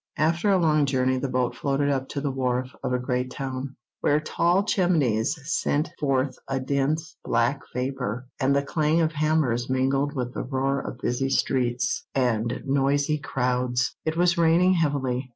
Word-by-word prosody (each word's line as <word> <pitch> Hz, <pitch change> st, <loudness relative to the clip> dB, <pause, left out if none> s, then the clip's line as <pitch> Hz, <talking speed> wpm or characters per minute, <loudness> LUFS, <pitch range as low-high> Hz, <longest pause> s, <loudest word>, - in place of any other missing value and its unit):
After 165 Hz, +6 st, +2 dB
a 195 Hz, -, +5 dB
long 155 Hz, -4 st, +3 dB
journey 130 Hz, -1 st, +1 dB
the 140 Hz, -, -2 dB
boat 125 Hz, -1 st, 0 dB
floated 140 Hz, +2 st, 0 dB
up 135 Hz, -1 st, -1 dB
to 140 Hz, -, -3 dB
the 140 Hz, -1 st, -1 dB
wharf 130 Hz, -1 st, -1 dB
of -, -, -2 dB
a 125 Hz, -, +2 dB
great 125 Hz, 0 st, -2 dB
town, 130 Hz, 0 st, -5 dB, 0.2 s
where 145 Hz, +1 st, +2 dB
tall 170 Hz, +5 st, +1 dB
chimneys 155 Hz, -, +1 dB
sent 150 Hz, -1 st, 0 dB
forth 135 Hz, -2 st, 0 dB
a 135 Hz, 0 st, -1 dB
dense, 140 Hz, +4 st, -1 dB
black 140 Hz, 0 st, +1 dB
vapour, 125 Hz, -2 st, -3 dB
and 140 Hz, 0 st, +2 dB
the 140 Hz, -, +2 dB
clang 155 Hz, +3 st, +1 dB
of 160 Hz, -1 st, +1 dB
hammers 150 Hz, -6 st, +1 dB
mingled 135 Hz, +3 st, +1 dB
with 125 Hz, -2 st, -3 dB
the -, -, -3 dB
roar 135 Hz, +1 st, -1 dB
of 125 Hz, -, -7 dB
busy 125 Hz, +2 st, -1 dB
streets 130 Hz, -, 0 dB
and 120 Hz, -3 st, 0 dB
noisy 140 Hz, +2 st, +1 dB
crowds. 125 Hz, -2 st, -1 dB
It 160 Hz, +1 st, -2 dB
was 175 Hz, 0 st, +3 dB
raining 170 Hz, +3 st, +4 dB
heavily. 135 Hz, -6 st, 0 dB
135 Hz, 170 wpm, -25 LUFS, 130-155 Hz, 0.2 s, a